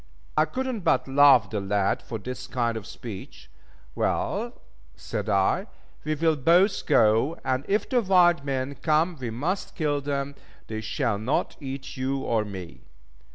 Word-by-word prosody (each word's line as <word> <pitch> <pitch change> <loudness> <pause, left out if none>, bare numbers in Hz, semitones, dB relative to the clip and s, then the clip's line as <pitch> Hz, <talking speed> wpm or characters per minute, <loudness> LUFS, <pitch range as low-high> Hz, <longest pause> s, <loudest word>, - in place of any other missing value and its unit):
I 155 - +4
could 255 +12 -3
not 240 -7 -3
but 160 - +2
love 135 -6 +6
the 105 - -1
lad 100 0 0
for 115 - -6
this 125 +4 -7
kind 115 -3 -1
speech. 100 0 -9 0.4
"Well," - - -1 0.4
said - - -4
I, 100 - +2 0.4
"we 155 0 -1
will 160 +1 +2
both 175 +8 +3
go, 115 +9 +3
and 130 +1 0
if 205 +2 +1
the 250 -2 +2
wild 180 -6 +4
men 135 -1 -2
come 160 +5 +1
we 125 -2 -3
must 155 - -3
kill 145 -3 0
them, 140 0 -2 0.3
they 110 -1 -5
shall 110 -1 -1
not 115 +6 -1
eat 135 0 -7
you 130 +1 -1
or 115 -4 +1
me." 95 -5 -8
135 Hz, 155 wpm, -26 LUFS, 115-160 Hz, 0.4 s, love